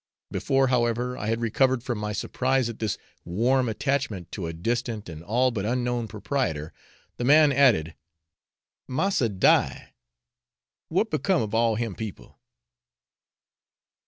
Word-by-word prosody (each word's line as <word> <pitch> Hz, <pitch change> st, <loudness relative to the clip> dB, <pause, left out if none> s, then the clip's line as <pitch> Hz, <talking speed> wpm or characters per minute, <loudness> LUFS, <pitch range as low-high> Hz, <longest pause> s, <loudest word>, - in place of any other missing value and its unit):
Before, 135 Hz, -1 st, +1 dB
however, 120 Hz, 0 st, +1 dB
I 105 Hz, -, -5 dB
had 115 Hz, +1 st, 0 dB
recovered 130 Hz, +2 st, +2 dB
from 120 Hz, -4 st, -3 dB
my 105 Hz, 0 st, -3 dB
surprise 130 Hz, +3 st, 0 dB
at 115 Hz, -, -8 dB
this 110 Hz, -4 st, -1 dB, 0.3 s
warm 120 Hz, +8 st, +1 dB
'attachment' 110 Hz, -, -2 dB
to 90 Hz, -5 st, -4 dB
a -, -, -3 dB
distant 115 Hz, +5 st, -3 dB
and 80 Hz, -2 st, -8 dB
all 125 Hz, +7 st, +2 dB
but 105 Hz, -5 st, -3 dB
unknown 120 Hz, +1 st, -1 dB
proprietor, 105 Hz, -, -2 dB, 0.4 s
the -, -, -3 dB
man 150 Hz, +3 st, +6 dB
added, 120 Hz, -, +3 dB, 0.9 s
'massa 130 Hz, -, +1 dB
die, 95 Hz, -2 st, +2 dB, 1.0 s
what 200 Hz, +7 st, +1 dB
become 155 Hz, -, +1 dB
of 105 Hz, 0 st, -5 dB
all 115 Hz, 0 st, +3 dB
him 115 Hz, -2 st, -2 dB
people?' 110 Hz, 0 st, -8 dB
120 Hz, 130 wpm, -26 LUFS, 105-130 Hz, 1.0 s, man